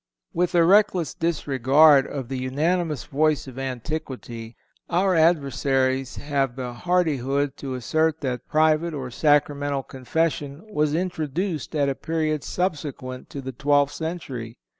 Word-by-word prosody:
With 175 Hz, +1 st, 0 dB
a 170 Hz, -, +6 dB
reckless 185 Hz, -2 st, +4 dB
disregard 145 Hz, -2 st, +4 dB
of 135 Hz, -4 st, -5 dB
the 130 Hz, 0 st, -4 dB
unanimous 150 Hz, +2 st, 0 dB
voice 155 Hz, +1 st, +1 dB
of 130 Hz, -1 st, -9 dB
antiquity 130 Hz, -3 st, -5 dB, 0.3 s
our 185 Hz, +2 st, +2 dB
adversaries 135 Hz, -5 st, +2 dB
have 140 Hz, -4 st, -1 dB
the 125 Hz, -2 st, -5 dB
hardihood 145 Hz, -3 st, 0 dB
to 135 Hz, -2 st, -5 dB
assert 155 Hz, +5 st, 0 dB
that 125 Hz, -3 st, -3 dB
private 155 Hz, +1 st, +2 dB
or 130 Hz, -3 st, -5 dB
Sacramental 145 Hz, -1 st, +1 dB
Confession 145 Hz, -, -2 dB
was 150 Hz, -2 st, +1 dB
introduced 165 Hz, -1 st, -2 dB
at 145 Hz, -2 st, +2 dB
a 140 Hz, -, +1 dB
period 155 Hz, +2 st, -2 dB
subsequent 145 Hz, -8 st, -3 dB
to 140 Hz, -, -6 dB
the 130 Hz, 0 st, -5 dB
twelfth 145 Hz, +2 st, +2 dB
century. 135 Hz, -9 st, -5 dB
145 Hz, 130 wpm, -24 LUFS, 130-160 Hz, 0.3 s, a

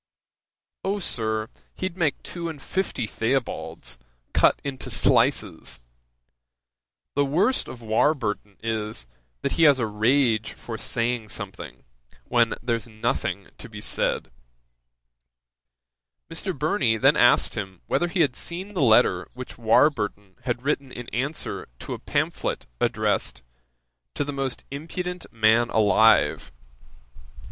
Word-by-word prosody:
"O, 195 Hz, +2 st, 0 dB
Sir, 110 Hz, -, 0 dB, 0.3 s
he'd 185 Hz, -2 st, -3 dB
make 165 Hz, -6 st, 0 dB
two 170 Hz, -1 st, -4 dB
and 155 Hz, -3 st, -7 dB
fifty 180 Hz, -6 st, -2 dB
Theobalds, 115 Hz, -, -2 dB, 0.3 s
cut -, -, +4 dB
into 135 Hz, -2 st, -4 dB
slices! 60 Hz, -, +1 dB, 1.3 s
The 145 Hz, -, +3 dB
worst 170 Hz, -, +2 dB
of 120 Hz, -2 st, -9 dB
Warburton 110 Hz, -3 st, 0 dB
is, 110 Hz, -, -3 dB, 0.4 s
that -, -, 0 dB
he 165 Hz, -, +4 dB
has 145 Hz, -3 st, +7 dB
a 120 Hz, -, 0 dB
rage 110 Hz, +1 st, +2 dB
for 115 Hz, -, -7 dB
saying 115 Hz, 0 st, -1 dB
something, -, -, -8 dB, 0.4 s
when 120 Hz, -1 st, +2 dB
there's 115 Hz, -1 st, -1 dB
nothing 110 Hz, -1 st, -2 dB
to -, -, -8 dB
be -, -, -8 dB
said." 65 Hz, -, 0 dB, 2.0 s
Mr. 175 Hz, +1 st, -3 dB
Burney 135 Hz, -, +2 dB
then 135 Hz, +6 st, +5 dB
asked 120 Hz, 0 st, +5 dB
him 95 Hz, -5 st, -5 dB
whether 175 Hz, -, +1 dB
he 175 Hz, +1 st, 0 dB
had 135 Hz, -5 st, +2 dB
seen 185 Hz, +4 st, -5 dB
the 180 Hz, -, -1 dB
letter 110 Hz, -7 st, +4 dB
which 125 Hz, -2 st, -8 dB
Warburton 110 Hz, -5 st, +2 dB
had 120 Hz, -1 st, -1 dB
written 140 Hz, -2 st, -1 dB
in 120 Hz, -1 st, -7 dB
answer 140 Hz, +7 st, -2 dB
to -, -, -6 dB
a -, -, -6 dB
pamphlet -, -, -1 dB
addressed -, -, 0 dB, 0.7 s
"To -, -, 0 dB
the 145 Hz, 0 st, -4 dB
most 135 Hz, -2 st, -3 dB
impudent 180 Hz, +5 st, -5 dB
Man 115 Hz, +1 st, +4 dB
alive." 110 Hz, +1 st, +4 dB
125 Hz, 125 wpm, -25 LUFS, 110-150 Hz, 2.0 s, has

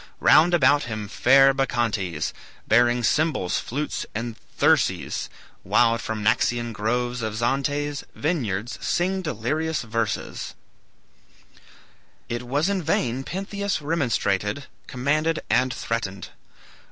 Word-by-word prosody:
"Round 175 Hz, +2 st, +6 dB
about 145 Hz, -3 st, +4 dB
him 110 Hz, -3 st, -5 dB
fair 135 Hz, +5 st, +5 dB
Bacchantes, 115 Hz, -, -1 dB, 0.3 s
Bearing 120 Hz, +2 st, +4 dB
cymbals, 150 Hz, -, +1 dB
flutes 145 Hz, +5 st, -3 dB
and 115 Hz, +1 st, -3 dB, 0.2 s
thyrses, -, -, +1 dB, 0.3 s
Wild 115 Hz, +3 st, +3 dB
from 110 Hz, -1 st, -4 dB
Naxian 120 Hz, +2 st, +1 dB
groves 120 Hz, +4 st, -1 dB
of 110 Hz, -1 st, -3 dB
Zante's 145 Hz, +5 st, -1 dB
Vineyards, 120 Hz, -, -2 dB
sing 190 Hz, +2 st, 0 dB
delirious 155 Hz, -, -2 dB
verses," 115 Hz, -2 st, -3 dB, 1.7 s
It 120 Hz, 0 st, -3 dB
was 145 Hz, +6 st, +1 dB
in 200 Hz, -2 st, 0 dB
vain 135 Hz, -5 st, 0 dB
Pentheus 200 Hz, +3 st, -3 dB
remonstrated, 130 Hz, -, -1 dB, 0.2 s
commanded, 155 Hz, +5 st, 0 dB
and 130 Hz, 0 st, +3 dB
threatened. 100 Hz, -6 st, -4 dB
125 Hz, 105 wpm, -24 LUFS, 110-150 Hz, 1.7 s, Round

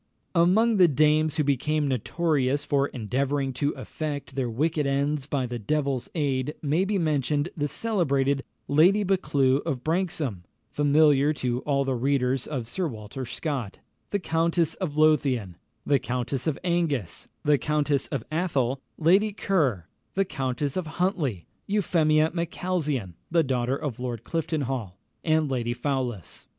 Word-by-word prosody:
Among 200 Hz, +6 st, +4 dB
the 180 Hz, -2 st, +7 dB
dames 155 Hz, +1 st, +3 dB
who 155 Hz, -, +2 dB
became 150 Hz, +2 st, +1 dB
notorious 140 Hz, -, 0 dB
for 140 Hz, -1 st, +2 dB
endeavouring 135 Hz, +4 st, -1 dB
to 140 Hz, +3 st, 0 dB
effect 145 Hz, -3 st, -5 dB
their 130 Hz, -3 st, -1 dB
wicked 150 Hz, +5 st, 0 dB
ends 140 Hz, +1 st, 0 dB
by 140 Hz, -3 st, -1 dB
the 120 Hz, -1 st, -4 dB
devil's 140 Hz, +2 st, -1 dB
aid 140 Hz, -2 st, -1 dB
may 155 Hz, +6 st, +2 dB
be 205 Hz, 0 st, 0 dB
mentioned 150 Hz, -2 st, 0 dB
the 145 Hz, -2 st, -1 dB
celebrated 140 Hz, -10 st, 0 dB, 0.2 s
Lady 180 Hz, +8 st, +5 dB
Buccleugh 145 Hz, -8 st, +2 dB
of 130 Hz, -3 st, -3 dB
Branxholme 160 Hz, -, -1 dB, 0.3 s
(familiar 145 Hz, 0 st, +4 dB
to 125 Hz, -4 st, -1 dB
all 140 Hz, -1 st, +2 dB
the 135 Hz, -, 0 dB
readers 130 Hz, 0 st, 0 dB
of 130 Hz, -7 st, -4 dB
Sir 180 Hz, +7 st, -2 dB
Walter 115 Hz, +1 st, -7 dB
Scott), 125 Hz, -, -4 dB, 0.3 s
the 205 Hz, -, 0 dB
Countess 165 Hz, -2 st, +1 dB
of 160 Hz, -6 st, -4 dB
Lothian, 135 Hz, -, +2 dB, 0.3 s
the 140 Hz, -2 st, +3 dB
Countess 125 Hz, +4 st, -3 dB
of 155 Hz, -, 0 dB
Angus, 165 Hz, -, -1 dB, 0.2 s
the 145 Hz, -2 st, +3 dB
Countess 150 Hz, -2 st, +1 dB
of 135 Hz, -6 st, -3 dB
Athol, 140 Hz, -6 st, 0 dB, 0.2 s
Lady 190 Hz, +7 st, +4 dB
Kerr, 150 Hz, -, 0 dB, 0.3 s
the 195 Hz, +1 st, +2 dB
Countess 135 Hz, -3 st, -2 dB
of 185 Hz, -3 st, -2 dB
Huntley, 160 Hz, -, 0 dB, 0.2 s
Euphemia 160 Hz, -6 st, +2 dB
Macalzean 165 Hz, -, -2 dB, 0.2 s
(the 165 Hz, -1 st, +3 dB
daughter 130 Hz, -1 st, 0 dB
of 145 Hz, -7 st, -4 dB
Lord 120 Hz, -3 st, -4 dB
Cliftonhall), 135 Hz, -, -2 dB, 0.3 s
and 155 Hz, -3 st, +2 dB
Lady 120 Hz, -2 st, -1 dB
Fowlis. 125 Hz, -, -3 dB
145 Hz, 140 wpm, -26 LUFS, 130-160 Hz, 0.3 s, the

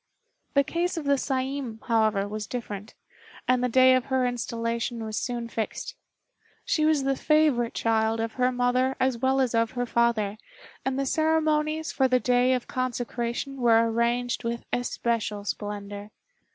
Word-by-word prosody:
The 280 Hz, -, +5 dB
case 345 Hz, +4 st, -2 dB
of 315 Hz, -, -4 dB
the 280 Hz, 0 st, +4 dB
Saiin, 265 Hz, -3 st, -2 dB
however, 215 Hz, -4 st, +2 dB
was 210 Hz, 0 st, -5 dB
different, 215 Hz, -4 st, -6 dB, 0.5 s
and 255 Hz, 0 st, +3 dB
the 250 Hz, -, +1 dB
day 255 Hz, +2 st, +6 dB
of 255 Hz, -1 st, +2 dB
her 260 Hz, -2 st, +1 dB
installation 235 Hz, -1 st, -2 dB
was 215 Hz, -1 st, -4 dB
soon 240 Hz, -1 st, -3 dB
fixed. 225 Hz, -, -4 dB, 0.7 s
She 325 Hz, -12 st, +1 dB
was 305 Hz, -3 st, +2 dB
the 270 Hz, 0 st, +1 dB
favorite 295 Hz, -6 st, +2 dB
child 225 Hz, 0 st, +1 dB
of 225 Hz, 0 st, -2 dB
her 255 Hz, 0 st, +1 dB
mother 250 Hz, +1 st, +1 dB
as 260 Hz, -2 st, +1 dB
well 265 Hz, +1 st, +2 dB
as 255 Hz, -3 st, +1 dB
of 230 Hz, -1 st, +1 dB
her 245 Hz, -, 0 dB
father, 225 Hz, -3 st, +1 dB, 0.4 s
and 265 Hz, 0 st, -1 dB
the 275 Hz, -, 0 dB
ceremonies 315 Hz, +1 st, +1 dB
for 265 Hz, -, +2 dB
the 255 Hz, -1 st, +3 dB
day 250 Hz, +1 st, +3 dB
of 250 Hz, -1 st, -1 dB
consecration 250 Hz, +1 st, -3 dB
were 230 Hz, -2 st, +4 dB
arranged 240 Hz, +2 st, 0 dB
with 235 Hz, 0 st, -3 dB
especial 230 Hz, -4 st, -1 dB
splendor. 205 Hz, 0 st, -5 dB
245 Hz, 160 wpm, -26 LUFS, 230-265 Hz, 0.7 s, day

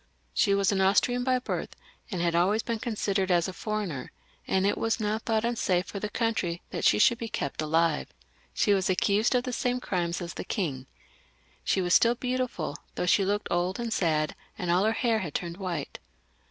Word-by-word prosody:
She 200 Hz, -3 st, +3 dB
was 200 Hz, 0 st, +2 dB
an 195 Hz, -1 st, +1 dB
Austrian 245 Hz, +6 st, +3 dB
by 255 Hz, 0 st, +2 dB
birth, 250 Hz, -, -4 dB, 0.3 s
and 180 Hz, -6 st, -2 dB
had 170 Hz, -1 st, +1 dB
always 195 Hz, +6 st, +2 dB
been 230 Hz, -2 st, -2 dB
considered 200 Hz, -4 st, -1 dB
as 175 Hz, -2 st, +3 dB
a 190 Hz, -, -5 dB
foreigner, 205 Hz, -, -4 dB, 0.4 s
and 190 Hz, 0 st, +2 dB
it 205 Hz, -, +2 dB
was 225 Hz, +1 st, 0 dB
now 215 Hz, 0 st, 0 dB
thought 220 Hz, 0 st, 0 dB
unsafe 195 Hz, -6 st, +1 dB
for 200 Hz, -, -6 dB
the 210 Hz, -, -3 dB
country 210 Hz, -7 st, -1 dB
that -, -, -4 dB
she 105 Hz, -, +5 dB
should 235 Hz, -, +4 dB
be 230 Hz, -, -4 dB
kept 140 Hz, -4 st, -3 dB
alive. 160 Hz, 0 st, +1 dB, 0.4 s
She 205 Hz, -, +2 dB
was 190 Hz, -1 st, +1 dB
accused 205 Hz, +6 st, +2 dB
of 245 Hz, -, +2 dB
the 250 Hz, -, -4 dB
same 250 Hz, +1 st, 0 dB
crimes 175 Hz, -6 st, -2 dB
as 175 Hz, -1 st, -5 dB
the -, -, -5 dB
king. 140 Hz, -, -3 dB, 0.8 s
She 190 Hz, -, +1 dB
was 175 Hz, 0 st, +5 dB
stiU 235 Hz, +1 st, +2 dB
beautiful, 250 Hz, -, -2 dB, 0.2 s
though -, -, -1 dB
she 195 Hz, +2 st, +4 dB
looked 205 Hz, +2 st, -1 dB
old 175 Hz, +3 st, 0 dB
and 235 Hz, -2 st, -2 dB
sad, 155 Hz, -5 st, +1 dB, 0.2 s
and 180 Hz, -5 st, -1 dB
aU 180 Hz, +4 st, +3 dB
her 220 Hz, -, +3 dB
hair 225 Hz, -1 st, +1 dB
had 170 Hz, -8 st, -5 dB
turned 170 Hz, -1 st, -3 dB
white. 180 Hz, -7 st, -4 dB
195 Hz, 205 wpm, -28 LUFS, 175-225 Hz, 0.8 s, she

